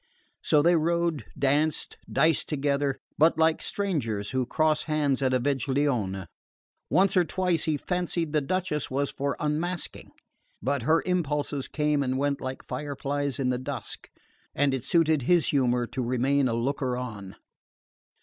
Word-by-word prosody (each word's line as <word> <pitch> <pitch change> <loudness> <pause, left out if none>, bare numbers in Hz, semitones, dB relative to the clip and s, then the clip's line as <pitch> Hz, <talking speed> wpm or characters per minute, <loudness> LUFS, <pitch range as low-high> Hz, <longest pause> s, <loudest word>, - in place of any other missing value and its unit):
So 150 -2 +3
they 170 +2 +5
rode, 170 -1 0
danced, 145 +3 +1 0.2
diced 160 -1 +2
together, 140 -1 0 0.2
but 160 +2 +5
like 160 0 +3
strangers 115 - -2
who 130 -2 0
cross 155 +1 +2
hands 145 -4 +1
at 130 -1 +2
a 130 - +2
veglione. 130 -7 0 0.6
Once 195 +1 +3
or 180 - +5
twice 175 0 0
he 155 -2 +1
fancied 175 -1 -2
the 150 - +3
Duchess 175 -1 -1
was 140 +2 -1
for 140 0 -2
unmasking; 160 +4 -2 0.5
but 140 +2 -1
her 160 +7 +2
impulses 150 -6 -1
came 150 -1 0
and 130 -1 0
went 140 +1 0
like 130 0 -5
fireflies 140 0 -3
in 130 -2 0
the 125 -1 0
dusk, 130 - -7 0.5
and 145 -1 +2
it 135 - -1
suited 160 +2 +2
his 170 +6 +3
humour 125 -3 +2
to 125 +2 -4
remain 130 +3 +1
a 115 - 0
looker 125 +1 -1
on. 105 -6 -6
145 Hz, 150 wpm, -27 LUFS, 130-160 Hz, 0.6 s, they